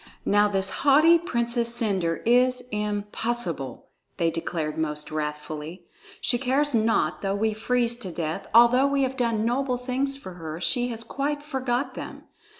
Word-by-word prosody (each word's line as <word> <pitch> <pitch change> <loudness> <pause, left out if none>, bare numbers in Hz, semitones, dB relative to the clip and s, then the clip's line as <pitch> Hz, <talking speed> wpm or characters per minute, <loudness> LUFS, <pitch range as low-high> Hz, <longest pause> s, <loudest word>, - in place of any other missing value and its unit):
"Now 205 +1 +4
this 195 -1 +1
haughty 310 +4 +6
Princess 235 -6 0
Cendre 190 -8 0
is 250 +2 +3
impossible!" 210 - -3 0.3
they 165 -1 +1
declared 160 -2 -3
most 150 -1 -3
wrathfully. 155 +3 -5 0.3
"She 245 - +1
cares 275 +3 +1
not 225 0 +1
though 195 0 -1
we 215 +1 0
freeze 240 +2 0
to 230 -6 -7
death; 160 -2 -4
although 240 +4 +6
we 280 -1 +1
have 260 0 -1
done 230 -4 0
noble 250 +1 0
things 265 +2 -2
for 190 -9 -9
her, 160 0 -6
she 245 +6 +2
has 230 -2 -4
quite 290 +5 -3
forgot 265 -2 -2
them. - - -8
230 Hz, 150 wpm, -25 LUFS, 180-255 Hz, 0.3 s, haughty